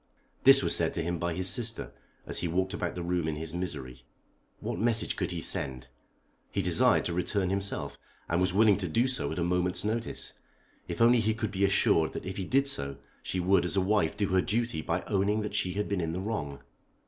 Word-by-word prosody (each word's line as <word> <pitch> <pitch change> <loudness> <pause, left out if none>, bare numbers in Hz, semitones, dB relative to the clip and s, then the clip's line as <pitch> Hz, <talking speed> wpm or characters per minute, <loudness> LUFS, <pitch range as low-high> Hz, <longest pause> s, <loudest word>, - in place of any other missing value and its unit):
This - - +9
was - - +3
said - - +1
to 85 - -2
him 85 0 -3
by 85 0 -2
his 95 +1 0
sister 110 - +1 0.3
as - - +1
he 85 - -1
walked 95 +3 -1
about 90 - -3
the 90 - -4
room 85 -2 -1
in 80 - -2
his 80 +1 -5
misery. 70 -9 -5 0.6
What - - -4
message 115 0 +2
could 90 - -2
he 85 -2 -4
send? 70 -10 0 0.6
He - - -2
desired - - +3
to 85 - -1
return 90 +2 -1
himself, 95 -8 -2 0.3
and 85 +2 0
was 90 0 +2
willing 105 +1 +4
to 95 -3 -2
do 115 +11 +1
so 130 - -1
at - - -5
a 85 - 0
moment's 90 +1 -1
notice 115 +2 -2 0.5
if - - -5
only 120 +1 +5
he 110 0 0
could 110 -2 -3
be 100 0 +1
assured 90 -4 +2
that - - -6
if 95 +1 -5
he 95 - -3
did 135 +5 +2
so 70 - -1 0.2
she 95 - -3
would 90 +1 +3
as 90 +1 -1
a 95 - +2
wife 95 -4 +1
do 100 -2 0
her 95 0 +3
duty 115 -4 -1
by 85 +3 -2
owning 105 +1 0
that 105 - -5
she 90 - -1
had 105 +2 -2
been 100 -3 -1
in 80 -1 -3
the 90 - -3
wrong. 75 -10 -4
95 Hz, 230 wpm, -29 LUFS, 85-105 Hz, 0.6 s, This